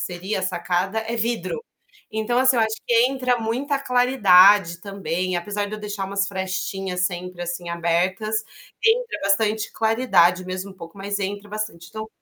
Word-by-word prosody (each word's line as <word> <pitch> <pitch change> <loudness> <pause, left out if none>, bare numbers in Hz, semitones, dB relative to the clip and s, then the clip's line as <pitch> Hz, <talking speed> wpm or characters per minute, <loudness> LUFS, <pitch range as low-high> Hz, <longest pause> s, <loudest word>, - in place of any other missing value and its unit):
seria 190 +3 -3
a - - -7
sacada, 185 +3 -1
é 225 +1 -4
vidro. 235 - -2 0.5
Então, 220 +3 0
assim 260 -1 +4
eu 225 - +4
acho 220 0 0
que 240 - +2 0.2
entra 255 -2 0
muita 260 +6 -1
claridade, 205 -9 +5
também, 185 -2 -3
apesar 205 +3 -2
de 205 - -10
eu 215 - -7
deixar 205 -2 -4
umas 195 0 -1
frestinhas 190 -1 -2
sempre, 180 -1 -6
assim, 175 0 -5
abertas, 185 +6 0 0.4
entra 460 +1 +2
bastante 210 +2 +1
claridade, 220 -6 +3
mesmo 185 +2 -5
um - - -20
pouco, 170 0 -11
mas 200 +1 -3
entra 205 +1 -4
bastante. 210 -6 -5
Então, 220 0 -6
200 Hz, 160 wpm, -23 LUFS, 180-220 Hz, 0.5 s, claridade